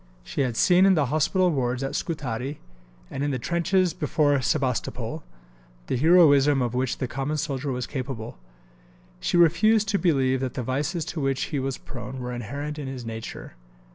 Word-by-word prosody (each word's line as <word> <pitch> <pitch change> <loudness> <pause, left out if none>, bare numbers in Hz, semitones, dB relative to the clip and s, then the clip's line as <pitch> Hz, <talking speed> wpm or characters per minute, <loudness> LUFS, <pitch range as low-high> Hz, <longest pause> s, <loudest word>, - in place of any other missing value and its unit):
She 140 - -3
had 125 -4 -1
seen 180 +1 +5
in 190 - +5
the 150 -3 +2
hospital 180 +4 +2
wards 130 -2 -1
at 135 - -3
Scutari, 140 -3 -3 0.5
and 135 - -3
in 145 - 0
the 135 - -1
trenches 175 +5 +1
before 150 -4 +1
Sebastopol, 130 -2 -1 0.6
the - - -1
heroism 145 -2 +5
of 120 -2 -1
which 130 0 -1
the 130 - -2
common 135 +4 -3
soldier 140 -2 -2
was 125 -1 -2
capable. 130 - -6 0.8
She 175 - 0
refused 205 +6 +4
to 200 -2 +1
believe 135 -7 +2
that 130 -1 -3
the 125 - -2
vices 150 +7 -2
to 170 -2 -4
which 135 -1 0
he 145 - +1
was 135 0 -2
prone 125 0 -8
were 125 0 -4
inherent 140 +6 -5
in 140 - -5
his 130 -3 -6
nature. 115 - -7
140 Hz, 175 wpm, -25 LUFS, 130-160 Hz, 0.8 s, seen